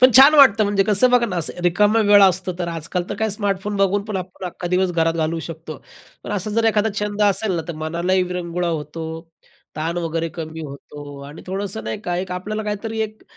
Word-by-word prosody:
पण 255 0 +8
छान 275 +3 +9
वाटतं, 225 -7 +7
म्हणजे 200 -1 +2
कसं 215 +4 +4
बघा 245 -1 +4
ना, 180 -4 -4
असं 170 +1 -3
रिकामा 205 +5 +3
वेळ 205 -1 +8
असतो, 185 -1 +3
तर 175 -1 -2
आजकाल 165 +2 -3
तर - - -1
काय, 220 -1 0
स्मार्टफोन 205 0 -2
बघून 195 +1 +2
पण 210 -3 -4
आपण 185 0 -7
अख्खा 175 0 -6
दिवस 180 0 +1
घरात 165 0 +1
घालवू 165 0 -1
शकतो. 160 -2 -8 0.5
पण - - -7
असा 205 +1 -2
जर 225 +2 +1
एखादा 220 0 +2
छंद 210 0 -1
असेल 205 0 +2
ना, 165 - -2
तर 170 - -4
मनालाही 175 +4 0
विरंगुळा 180 -1 -3
होतो, 160 0 -4 0.7
ताण 165 +3 -2
वगैरे 165 0 -2
कमी 160 -1 -6
होतो 145 0 -10
आणि 150 - -11
थोडंसं 190 - -4
नाही 110 0 -4
का, 175 0 -3
एक 185 0 -4
आपल्याला 215 +4 -4
काहीतरी 215 +2 -4
एक, 215 0 -4
185 Hz, 210 wpm, -21 LUFS, 165-210 Hz, 0.7 s, छान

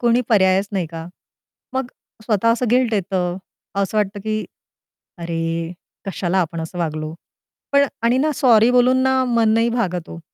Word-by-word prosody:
कोणी 240 0 +3
पर्यायच 195 -2 +3
नाही 185 -4 -1
का? 165 0 -8 0.7
मग 265 -1 -1 0.4
स्वतः 220 0 +1
असं 245 +2 -1
गिल्ट 245 -1 +3
येतं. 180 -2 -1 0.4
असं 200 +2 -1
वाटतं, 205 0 -1
की 215 +1 -2 0.7
"अरे 165 0 -3 0.3
कशाला 190 -1 -1
आपण 165 -1 -3
असं 160 +2 -7
वागलो?" 155 -2 -3 0.6
पण 280 0 +5 0.2
आणि 240 +2 +3
ना 305 +3 +2
सॉरी 235 -2 +5
बोलून 250 +1 +4
ना 265 0 +3
मन 235 -2 +2
नाही 230 +1 +3
भागत 180 -8 -2
हो. 165 - -8
205 Hz, 155 wpm, -20 LUFS, 175-240 Hz, 0.7 s, पण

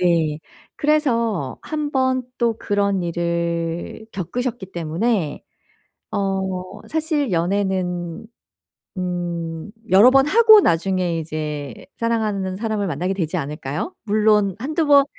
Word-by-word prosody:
네. 165 -4 +2 0.4
그래서 235 - +1
1 300 -2 -3
번 260 -1 +2 0.2
또 230 -2 +1
그런 200 -2 0
일을 170 +3 -2
겪으셨기 200 +2 -4
때문에 170 +1 -1 0.7
어 190 0 -2
사실 310 - 0
연애는 180 +1 -1 0.7
음 175 -1 -3 0.2
여러 205 +7 +8
번 270 +1 +5
하고 440 +3 +8
나중에 175 - +1
이제 150 -5 -5
사랑하는 210 -5 -1
사람을 215 -2 -1
만나게 180 +4 -1
되지 165 -5 -2
않을까요? 150 - -4
물론 210 -2 +3
한두 310 +5 -1
번 280 -1 +7
190 Hz, 215 characters per minute, -21 LUFS, 170-230 Hz, 0.7 s, 여러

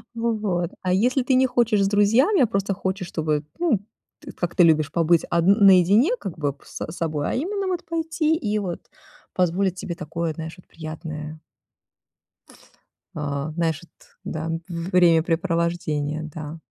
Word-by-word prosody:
Вот, 210 -7 -1
а 185 - -1
если 250 +6 +2
ты 260 0 +2
не 260 - +5
хочешь 235 -4 +2
с 195 - +2
друзьями, 225 - +3
а 245 - +5
просто 195 -2 -1
хочешь, 190 0 -3
чтобы, 155 -3 -1 0.2
ну, 315 - +2 0.4
т - - -10
как 175 -1 -4
ты 180 - +6
любишь 155 -3 +3
побыть 170 -1 +3
одн 170 +3 +4
наедине, 195 - +6
как 175 -4 -6
бы 145 -2 -1
п 140 - -25
с - - -6
собой, 155 -4 -2
а - - -2
именно 390 +8 -2
вот 360 -2 -2
пойти 320 -1 0
и 215 -8 -1
вот 180 -4 -4 0.5
позволить 185 +1 +1
тебе 180 -2 -5
такое, 165 -1 -3
знаешь, 160 +1 -7
вот 180 - -18
приятное 155 -1 -7 1.8
А, 145 0 -3
знаешь, 165 -2 -1
вот, 170 - -17 0.4
да, 160 +1 -3 0.2
времяпрепровождение, 170 -3 +1
да. 155 +1 -7
175 Hz, 155 wpm, -23 LUFS, 160-210 Hz, 1.8 s, ты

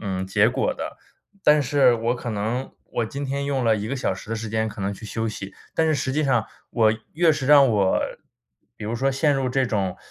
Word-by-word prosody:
嗯， 95 -2 -3
结 95 - +3
果 - - 0
的。 - - -6 0.5
但 150 -1 +5
是 135 -2 +4
我 115 +1 0
可 120 -1 -5
能 110 +5 -3
我 120 - -2
今 140 +5 -5
天 140 +1 -2
用 135 -3 -1
了 110 -1 +3
1 105 +1 -4
个 135 - -2
小 95 - -1
时 105 - -11
的 115 - -1
时 110 0 -5
间 110 0 -1
可 105 -1 -8
能 100 +1 -1
去 105 - -12
休 110 +1 -3
息， 100 -2 -7 0.2
但 160 - +2
是 155 - +2
实 130 -1 -1
际 155 +1 +1
上 125 -5 +2 0.2
我 110 -2 +3 0.2
越 165 +1 +4
是 135 -3 -3
让 140 -2 +7
我 100 -4 +2 0.8
比 - - -8
如 110 - -2
说 135 +3 +1
陷 145 +2 +2
入 135 -1 0
这 130 +1 +1
种， 95 -5 -1
120 Hz, 250 characters per minute, -23 LUFS, 110-135 Hz, 0.8 s, 让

